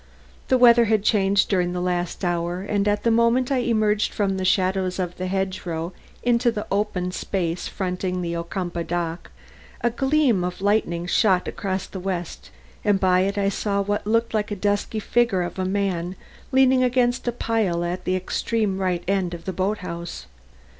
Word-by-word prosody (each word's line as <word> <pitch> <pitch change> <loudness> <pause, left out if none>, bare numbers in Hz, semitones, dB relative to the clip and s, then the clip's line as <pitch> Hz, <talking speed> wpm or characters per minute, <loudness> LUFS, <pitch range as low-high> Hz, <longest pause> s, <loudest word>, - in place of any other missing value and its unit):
The 260 - +4
weather 240 -1 +7
had 215 -2 +2
changed 200 -2 +3
during 180 -3 +1
the 180 - -2
last 180 +1 -2
hour 175 +1 -1
and 205 0 0
at 205 0 +1
the 230 - +3
moment 235 +3 +3
I 270 - +2
emerged 215 -3 +1
from 195 -2 0
the 190 - -2
shadows 185 0 +1
of 180 -2 -3
the 185 - -3
hedge 190 0 -2
row 170 +1 -4 0.3
into 240 0 +3
the 210 -2 -4
open 195 -3 -1
space 175 -2 -2
fronting 180 -1 -3
the 170 0 -2
Ocumpaugh 170 0 -4
dock, 170 -1 -3 0.5
a 240 - +1
gleam 265 -5 +2
of 180 0 -3
lightning 195 -4 +1
shot 185 0 +2
across 190 -2 -3
the 190 - -8
west 180 -2 -4 0.3
and 205 -2 +3
by 185 -1 +3
it 195 +2 0
I 200 -1 +2
saw 200 0 -1
what 205 +1 -1
looked 230 +1 +1
like 210 -1 0
the 205 - -4
dusky 205 +2 -1
figure 215 -4 +1
of 175 +2 -6
a 185 - 0
man 185 -2 -1 0.4
leaning 260 -1 +4
against 245 -1 +1
a - - +3
pile 220 -7 0
at 180 +1 -4
the 185 - +1
extreme 195 +1 -1 0.3
end 185 -3 0
of 165 0 -12
the 190 - -3
boat 195 +4 0
house. 170 - -6
195 Hz, 180 wpm, -23 LUFS, 180-215 Hz, 0.5 s, weather